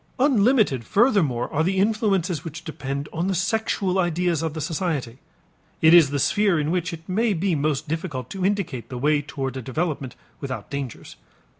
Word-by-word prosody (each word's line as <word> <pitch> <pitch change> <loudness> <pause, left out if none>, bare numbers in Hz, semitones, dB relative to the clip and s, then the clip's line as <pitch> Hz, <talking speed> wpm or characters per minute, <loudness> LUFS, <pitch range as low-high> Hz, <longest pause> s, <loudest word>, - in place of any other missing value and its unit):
Unlimited 235 - +3
furthermore 185 - +2
are 155 +1 +2
the 190 +3 0
influences 195 - +1
which 160 0 -7
depend 140 -3 -4
upon 170 +3 -2
the 190 - 0
sexual 195 -1 0
ideas 175 -2 +1
of 160 -1 -3
the - - -3
society. 150 -6 -3 0.6
It 160 +1 +6
is 165 -5 +8
the 145 - -1
sphere 190 +5 +2
in 150 +1 -1
which 175 -2 -1
it 165 0 -9
may 215 +4 +1
be 185 +1 0
most 150 0 -1
difficult 150 -5 -4
to 190 -2 -4
indicate 185 - -1
the 125 - -5
way 145 +3 +2
towards 135 -2 -5
a - - -4
development 135 0 -3 0.2
without 130 -2 -6
dangers. 140 -4 -6
165 Hz, 175 wpm, -23 LUFS, 140-190 Hz, 0.6 s, is